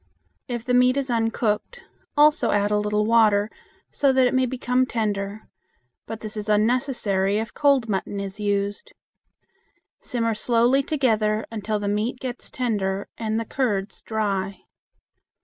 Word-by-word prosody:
If 240 -3 -4
the 250 - 0
meat 250 +1 +4
is 270 -2 -1
uncooked, 225 - -1 0.3
also 300 +1 +5
add 205 0 +1
a 210 - +2
little 210 0 0
water, 215 -2 +3 0.4
so 280 -2 +2
that 260 -1 +4
it 250 - +1
may 260 0 +2
become 250 0 0
tender; 210 -2 -2 0.6
but 225 -1 -6
this 215 0 -5
is 210 0 -3
unnecessary 210 -3 +1
if 225 +1 -3
cold 280 -5 +3
mutton 200 0 -2
is 200 +1 -5
used. 205 0 -2 1.1
Simmer 230 -4 -1
slowly 240 +4 +2
together 220 -7 +1
until 215 -1 -2
the 205 -1 -3
meat 215 +5 -1
gets 250 -1 -6
tender 200 -6 -2
and 220 -1 -1
the 230 - -3
curds 210 -6 -2
dry. 200 -3 -2
220 Hz, 145 wpm, -24 LUFS, 205-250 Hz, 1.1 s, also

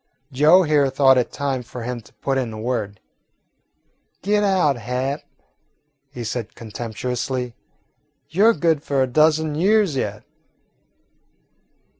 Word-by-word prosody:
Joe 155 +8 +5
here 150 -4 +3
thought 135 -1 +4
it 125 - -2
time 135 -2 -2
for 120 0 -8
him 120 0 -4
to - - -20
put 135 -1 +1
in 120 -3 -3
a 110 - -8
word. 110 -4 -3 1.2
"Get 210 +1 +2
out, 185 -8 +2
Hat," 125 +5 -3 0.9
he 125 -3 -7
said 115 0 -5
contemptuously; 120 +3 -4 0.7
"you 195 +7 +3
're 230 - +6
good 165 -7 +1
for 140 -2 0
a - - -1
dozen 155 +3 +2
years 195 +1 +2
yet." 105 -5 -3
135 Hz, 130 wpm, -21 LUFS, 120-155 Hz, 1.2 s, re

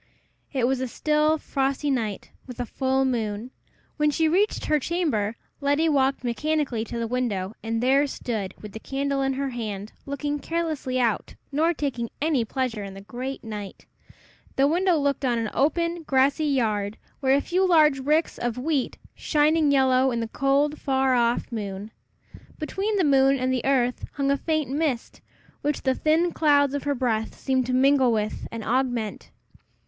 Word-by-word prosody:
It 260 -4 +1
was 260 +1 0
a 260 - -1
still, 305 +4 +1
frosty 275 0 -1
night, 220 -6 -2 0.2
with 250 -1 -9
a 245 - -1
full 265 +2 0
moon. 225 -2 -2 0.5
When 300 -1 +3
she 320 +2 +2
reached 390 +7 +1
her 305 -1 +2
chamber, 270 - -1 0.2
Letty 285 +3 +2
walked 270 -3 +2
mechanically 265 -1 -1
to 235 - -6
the 230 - -1
window, 225 -5 -2
and 225 +1 -2
there 275 +3 +4
stood, 220 -8 -4
with 210 - -9
the 220 - -8
candle 275 +2 -2
in 270 0 +1
her 275 0 -2
hand, 215 -3 -5
looking 290 +1 -2
carelessly 310 -6 -2
out, 230 -4 0 0.2
nor 315 +4 +2
taking 270 -7 -3
any 295 -5 +1
pleasure 235 -3 -2
in 195 -1 -8
the 195 - -9
great 255 +6 -6
night. 210 -3 -7 0.7
The 270 +1 +4
window 350 +2 +2
looked 280 -1 0
on 245 -3 +1
an 225 -2 -2
open, 335 +4 +1
grassy 280 +1 +2
yard, 215 -7 0 0.2
where 265 -1 +3
were - - +5
a - - +3
few 360 +6 0
large 305 -5 +5
ricks 300 +5 +1
of 240 -1 -2
wheat, 275 0 -1 0.2
shining 305 0 +2
yellow 265 -1 +4
in 235 -2 -1
the 230 - -2
cold, 275 +5 +1
far 265 -1 +2
off 240 0 +1
moon. 205 -1 -5 0.7
Between 390 +7 -2
the 380 - +3
moon 275 -2 +4
and 255 0 0
the 250 - -1
earth 250 -2 +1
hung 275 -1 0
a 280 - +2
faint 310 -3 -1
mist, 285 -5 -2 0.4
which 295 0 -1
the 265 - +2
thin 320 +5 +2
clouds 285 -4 +3
of 285 - -3
her 285 -1 +1
breath 225 -4 -1
seemed 260 -2 0
to 255 - -1
mingle 265 -1 +4
with 215 -1 -2
and 230 -1 -5
augment. 245 -2 -1
270 Hz, 175 wpm, -25 LUFS, 235-295 Hz, 0.7 s, were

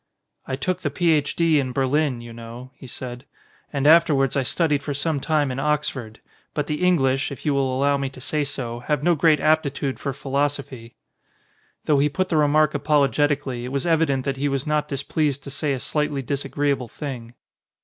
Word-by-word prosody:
"I 130 - -2
took 185 +6 -2
the - - -1
Ph. 160 -6 +1
D. 165 -3 +3
in 130 -2 -2
Berlin, 135 -1 +1
you 120 0 -10
know," 115 +2 -10
he 130 - -13
said. 125 0 -7 0.5
"And 140 -1 -1
afterwards 150 -4 +5
I 140 - +2
studied 150 +1 +1
for 145 -1 -4
some 145 +1 -1
time 150 -1 +1
in 130 - -4
Oxford. 135 -6 -2 0.3
But 150 - 0
the 150 +2 -3
English, 135 -7 +2
if 140 - -9
you 150 - +2
will 135 -1 +1
allow 140 +2 +2
me 135 -1 -2
to 130 - -13
say 150 +3 -1
so, 125 -4 -4
have 150 +3 -1
no 175 +1 +4
great 155 -1 +4
aptitude 145 -3 +1
for 140 - -2
philosophy." 135 -3 -3 0.9
Though 145 -2 +3
he 145 +2 +3
put 185 +5 -1
the 160 - +1
remark 150 0 +3
apologetically 145 -3 +1
it 125 - -5
was 140 +2 -1
evident 155 -6 +2
that 135 -1 -1
he 145 +2 0
was 135 -1 -2
not 150 -1 0
displeased 145 0 -1
to 140 - -7
say 140 +1 -1
a 135 - -1
slightly 145 0 -1
disagreeable 140 0 -1
thing. 125 -4 -7
140 Hz, 190 wpm, -23 LUFS, 130-150 Hz, 0.9 s, afterwards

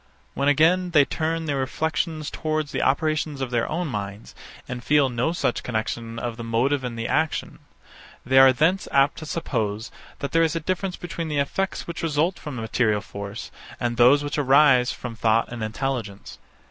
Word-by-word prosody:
When 140 +1 -1
again 165 +5 +4
they 145 - +7
turn 160 +2 -2
their 145 -2 -1
reflections 155 +3 -2
towards 155 -1 -2
the - - -1
operations 150 +1 0
of 130 -2 -3
their 120 -1 0
own 170 +2 -2
minds, 100 -4 -6 0.3
and 125 -1 -6
feel 145 -1 +3
no 125 +5 0
such 170 - -1
connexion 115 0 -3
of 115 -1 -4
the 120 - -6
motive 130 +5 +1
and 120 -2 -4
the 115 0 -3
action; 160 -1 -1 0.7
they 130 +2 +5
are 135 0 +9
thence 165 +9 +1
apt 140 +1 +3
to 155 - -8
suppose, 115 -9 -2 0.3
that 140 - -4
there 165 - +3
is 165 0 +2
a - - 0
difference 185 +3 -2
between 170 -1 -5
the 150 -2 -2
effects 190 +7 -1
which 170 - -6
result 165 +3 0
from 150 -3 -7
material 110 -2 0
force, 100 0 -7 0.3
and 120 -1 -1
those 130 +5 +6
which 145 +1 -2
arise 135 -2 +5
from 120 -2 -7
thought 110 +1 +1
and 120 - -6
intelligence. 110 -2 -4
135 Hz, 185 wpm, -24 LUFS, 115-155 Hz, 0.7 s, are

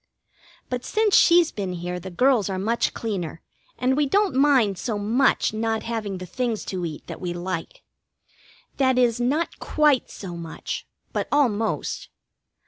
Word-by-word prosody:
But 250 -1 -3
since 430 +4 +2
she's 340 -1 +6
been 195 -3 -4
here 180 +1 -4
the 185 +2 -7
girls 240 +1 +2
are 190 - -2
much 225 +5 0
cleaner, 185 -8 -3 0.4
and 255 +1 +1
we 295 0 +2
don't 400 +5 +2
mind 260 -8 +3
so 220 -2 -2
much 225 +4 +2
not 225 0 -1
having 220 -4 -3
the 185 - -7
things 235 +3 -2
to 180 -1 -2
eat 155 -2 -8
that - - -8
we 175 -2 -2
like. 175 -1 -5 0.9
That 260 -2 +3
is, 240 -2 +3
not 290 +7 0
quite 295 -4 +2
so 180 -4 -7
much. 165 -1 -6 0.3
But - - -1
almost. 230 -7 0
225 Hz, 155 wpm, -24 LUFS, 185-265 Hz, 0.9 s, she's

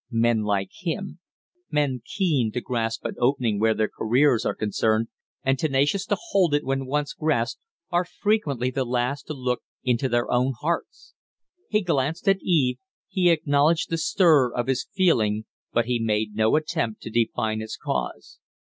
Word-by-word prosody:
Men 115 -1 +2
like 100 -2 -1
him 180 +2 -4 0.5
men 140 -4 0
keen 145 - 0
to 125 - -1
grasp 115 -3 -2
an - - -2
opening 120 -4 +1
where 110 0 +3
their 110 0 +1
careers 120 +1 +2
are - - -1
concerned, 110 +1 0 0.3
and 135 0 +1
tenacious 150 +7 +1
to - - +1
hold 180 -7 +3
it 145 - 0
when 135 0 -2
once 145 +2 -1
grasped 150 -7 -1 0.3
are 175 +1 +2
frequently 155 - 0
the 130 +1 -1
last 125 +3 -2
to 155 - -4
look 125 -2 -2 0.2
into 125 +1 +1
their 120 0 +1
own 125 +2 +2
hearts. 170 +3 -3 0.6
He 210 0 +2
glanced 160 +1 -1
at 195 0 +4
Eve, 140 -8 +2 0.3
he 180 -3 +3
acknowledged 155 0 +2
the 165 - +1
stir 155 -7 +4
of 120 0 -2
his 130 0 -1
feeling, 110 - +2 0.3
but 120 -1 +1
he 120 0 0
made 110 -1 0
no 110 +3 +2
attempt 155 -7 -1
to 110 - -6
define 110 -1 0
its 110 - -6
cause. 60 -1 -4
130 Hz, 170 wpm, -25 LUFS, 115-155 Hz, 0.6 s, at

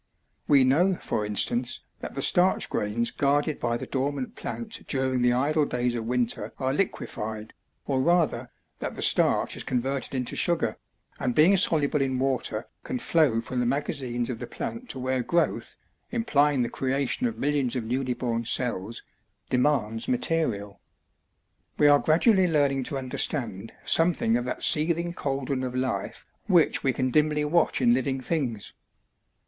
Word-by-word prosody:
We 140 -2 +5
know 170 +9 +3
for 105 -10 -3
instance 120 +4 0 0.2
that - - -8
the - - -1
starch 180 +1 +3
grains 115 +3 -1
guarded 145 +2 0
by 120 0 -1
the - - -6
dormant 145 - -3
plant 230 -1 -5
during 130 -2 0
the 120 0 +3
idle 150 +5 +1
days 125 -3 -1
of 115 -2 -4
winter 120 -3 -2
are 130 0 -1
liquified, 110 - -3 0.3
or 135 -2 0
rather, 150 -6 +1 0.3
that - - -5
the - - -1
starch - - +3
is - - -5
converted 135 +2 -2
into 125 -2 -3
sugar, 170 -1 0 0.4
and 125 - -1
being 170 +6 +6
soluble 150 -6 +3
in 130 -1 0
water 125 -4 -2 0.2
can 255 - -3
flow 155 - +2
from 125 +2 -4
the 120 - 0
magazines 130 -3 -2
of 115 - -6
the - - -6
plant 235 +2 -6
to - - -4
where 130 0 -1
growth, 170 +7 -1 0.3
implying 145 - +1
the 120 - -2
creation 135 - 0
of 230 - -5
millions 140 -3 0
of 125 - -2
newly 125 +2 -2
born 115 -2 -2
cells, 115 -2 -1 0.5
demands 125 -4 0
material. 160 - -2 1.0
We 150 - +5
are 145 0 +6
gradually 185 +5 +3
learning 140 -5 +1
to 140 - -3
understand 125 -5 0
something 165 -9 +3
of 120 0 -1
that 125 - -4
seething 170 +2 +3
cauldron 135 -4 -3
of 125 -1 -4
life 130 -7 -3 0.2
which 175 -6 +3
we 135 - +2
can 130 0 -1
dimly 150 +1 +2
watch 165 -2 +1
in 120 -2 +4
living 130 +1 -1
things. 130 -7 -3
135 Hz, 160 wpm, -26 LUFS, 120-155 Hz, 1.0 s, being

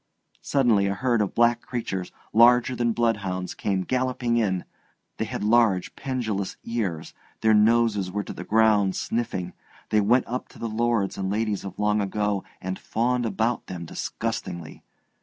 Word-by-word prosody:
Suddenly 115 -8 +2
a 100 - -1
herd 120 +1 +1
of 100 - -2
black 120 0 +3
creatures 95 -7 -4 0.2
larger 120 +2 +5
than 120 -1 +1
bloodhounds 100 -6 -1
came 95 -2 -1
galloping 125 0 0
in; 95 -6 0 0.5
they - - -1
had - - -4
large 110 -4 +3
pendulous 110 -8 -3
ears, 100 -9 -3 0.3
their 110 0 +4
noses 105 -3 +3
were 105 +2 -2
to - - -7
the - - -7
ground 105 -3 +3
sniffing, 100 -7 -2 0.4
they 105 - +4
went 120 +5 +3
up 125 +2 -4
to - - -17
the 115 - -3
lords 115 -3 0
and 95 -1 -1
ladies 105 -1 -1
of 95 -2 -7
long 105 0 +2
ago 100 0 -1 0.2
and 95 +1 -4
fawned 120 +1 0
about 110 +3 -1
them 85 -2 -6
disgustingly. 85 0 -5
110 Hz, 160 wpm, -25 LUFS, 95-120 Hz, 0.5 s, larger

